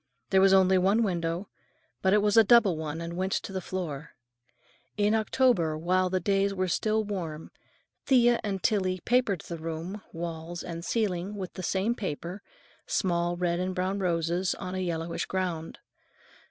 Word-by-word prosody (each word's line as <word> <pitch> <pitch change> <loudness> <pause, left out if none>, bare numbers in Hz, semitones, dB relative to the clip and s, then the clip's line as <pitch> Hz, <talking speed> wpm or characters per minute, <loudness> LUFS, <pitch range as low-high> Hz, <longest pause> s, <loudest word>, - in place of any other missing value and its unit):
There 190 -1 +5
was 195 0 +6
only 190 -1 +5
one 200 +5 +3
window, 175 -1 -2 0.5
but 190 - +3
it 210 0 +4
was 210 -1 +2
a 225 - +8
double 215 -4 +5
one 155 +1 -4
and 170 0 -5
went 190 +1 -1
to 195 - -3
the 190 - -2
floor. 160 -5 -5 0.8
In 210 +1 +3
October, 220 -8 +2
while 185 +3 +1
the 185 0 0
days 195 +2 +1
were 185 0 0
still 215 +4 +1
warm, 170 -7 -5 0.6
Thea 240 -2 +5
and 195 -3 -3
Tillie 185 -4 +1
papered 235 -7 +1
the 170 -1 -7
room, 165 +5 -5
walls 170 0 -5
and 170 -1 -6
ceiling 200 -2 -1
in 190 -2 -3
the 185 - -6
same 190 +5 0
paper, 185 -3 -5 0.5
small 175 -2 0
red 175 -1 0
and 185 0 -2
brown 190 +2 -1
roses 175 0 0
on 185 -1 -6
a 190 - -2
yellowish 170 -2 -2
ground. 175 -4 -3
185 Hz, 165 wpm, -28 LUFS, 170-200 Hz, 0.8 s, a